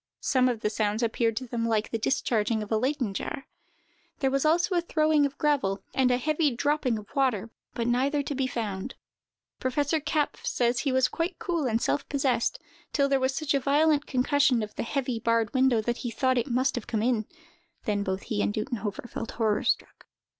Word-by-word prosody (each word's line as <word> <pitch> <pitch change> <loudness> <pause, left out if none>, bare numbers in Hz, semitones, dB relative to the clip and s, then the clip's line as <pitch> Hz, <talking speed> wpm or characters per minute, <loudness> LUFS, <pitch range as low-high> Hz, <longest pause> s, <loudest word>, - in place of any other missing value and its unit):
Some 255 -2 +3
of 235 -3 -3
the 210 - +1
sounds 215 +1 0
appeared 225 -1 0
to 255 - -2
them 230 -1 -2
like 220 -1 0
the 225 - -1
discharging 220 -2 0
of 210 - -10
a - - +3
Leyden 255 -3 -1
jar. 270 - -4 0.7
There 270 -2 +1
was 275 +2 +1
also 345 +6 +3
a 350 - +3
throwing 310 -3 +2
of 280 - -13
gravel, 270 -10 +1
and 260 -1 +3
a 250 - +3
heavy 305 +3 +1
dropping 285 -2 +1
of 210 +6 -11
water, 240 -6 +1 0.2
but 235 - -1
neither 270 +5 +1
to 285 - -3
be 265 -1 0
found. 220 -2 -4 0.6
Professor 285 +4 0
Kapff 300 0 -1
says 240 0 +1
that - - -1
he 275 - +2
was 260 0 +3
quite 335 +2 -3
cool 335 -6 -1
and 225 -1 +1
self 285 - -1
possessed, 270 - +1 0.3
till 280 -2 +2
there 275 -1 +2
was 260 0 0
such 310 -2 0
a 275 - +3
violent 295 +2 +2
concussion 260 -2 +2
of 210 - -7
the - - -4
heavy, 250 -1 -2
barred 230 -1 +1
window, 260 -4 +3
that 240 +2 -2
he 240 - -4
thought 255 +2 +1
it 240 - -2
must 255 +2 +1
have 245 - -5
come 220 -2 -1
in; 230 -3 +1 0.6
then 205 -3 0
both 190 -1 -2
he 205 -2 -2
and 205 - 0
Duttenhofer 215 -1 -3
felt 225 - -5
horror 220 -3 +1
struck. - - -2
255 Hz, 210 wpm, -27 LUFS, 225-280 Hz, 0.7 s, Some